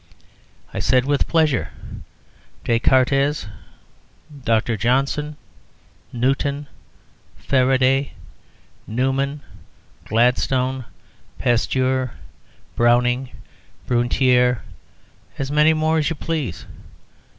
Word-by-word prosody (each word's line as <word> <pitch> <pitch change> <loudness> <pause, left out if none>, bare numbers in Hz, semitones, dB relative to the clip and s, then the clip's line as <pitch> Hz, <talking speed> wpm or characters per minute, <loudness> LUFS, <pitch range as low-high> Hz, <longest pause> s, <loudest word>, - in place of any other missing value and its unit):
I - - -3
said, 125 -1 +2
"With 145 0 +1
pleasure. 150 - +1 0.9
Descartes, 130 +5 +2 1.0
Dr. 115 0 +1
Johnson, 135 +7 0 0.7
Newton, 135 +4 -1 0.7
Faraday, 130 - +2 0.7
Newman, 135 +5 -1 0.6
Gladstone, 125 +3 +1 0.5
Pasteur, 130 +1 0 0.6
Browning, 125 +2 +2 0.6
Brunetiere 125 0 +2 0.7
as 135 0 -3
many 150 +1 +4
more 160 0 +1
as 150 - 0
you 165 - -3
please." 145 - -4
130 Hz, 70 wpm, -21 LUFS, 125-140 Hz, 1.0 s, many